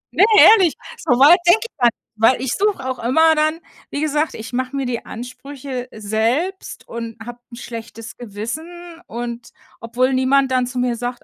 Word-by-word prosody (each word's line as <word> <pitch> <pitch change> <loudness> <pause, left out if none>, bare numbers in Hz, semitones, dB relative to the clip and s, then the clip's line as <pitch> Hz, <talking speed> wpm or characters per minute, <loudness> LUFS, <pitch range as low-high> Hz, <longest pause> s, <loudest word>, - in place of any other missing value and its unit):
Ne, - - +5 0.2
ehrlich, 380 -8 +7 0.2
soweit 275 +8 +5
denke 350 +5 +6
ich - - -48
gar 245 - +5
nicht, 235 - 0 0.2
weil 225 +4 +3
ich 260 -2 -2
suche 395 -10 -1
auch 260 -1 -3
immer 320 +7 +3
dann 310 +1 0 0.3
wie 285 - -4
gesagt, 305 +1 -1
ich 225 +3 -9
mache 255 +2 -3
mir 275 -1 -2
die 245 -2 -3
Ansprüche 255 +2 -7
selbst 225 - -2
und 230 -1 -7
habe 240 0 -9
'n - - -9
schlechtes 230 -1 -9
Gewissen 315 - -8
und 235 +1 -6 0.3
obwohl 250 +3 0
niemand 260 +1 +2
dann 255 -1 +1
zu 250 +1 -7
mir 245 -1 0
sagt 245 +1 -5
255 Hz, 175 wpm, -19 LUFS, 235-305 Hz, 0.3 s, ehrlich